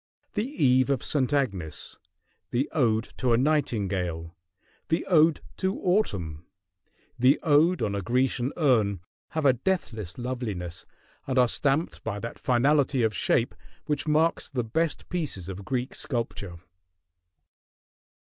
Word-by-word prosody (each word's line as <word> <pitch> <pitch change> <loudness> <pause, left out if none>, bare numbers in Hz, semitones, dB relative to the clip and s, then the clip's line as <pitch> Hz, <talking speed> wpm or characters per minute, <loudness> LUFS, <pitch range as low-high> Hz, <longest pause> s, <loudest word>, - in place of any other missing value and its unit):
"The 210 +3 -1
Eve 130 - +3
of 140 -3 0
St. 140 -3 0
Agnes," 100 - -2 0.5
the 130 +4 0
"Ode 115 -6 +1
to 125 -3 +2
a - - +4
Nightingale," 100 - 0 0.5
the 165 - 0
"Ode 160 -3 +4 0.2
to 190 +1 -1
Autumn," 95 - 0 0.8
the 130 +4 +5
"Ode 160 0 +4
on 105 -2 0
a 100 - -1
Grecian 125 +4 +1
Urn," 110 - +2 0.4
have 155 - 0
a 135 - +7
deathless 115 - -2
loveliness 110 -9 -4 0.4
and 130 -1 -1
are 125 -1 +6
stamped 145 +6 0
by 100 - -3
that 115 +3 -6
finality 135 +1 +2
of 110 -1 +2
shape - - +1 0.3
which 145 0 -2
marks 155 +2 +2
the 125 -3 -1
best 160 +8 -1
pieces 150 - -3
of 95 +1 -6
Greek 125 +4 -2
sculpture. 115 -8 -4
125 Hz, 130 wpm, -27 LUFS, 105-150 Hz, 0.8 s, a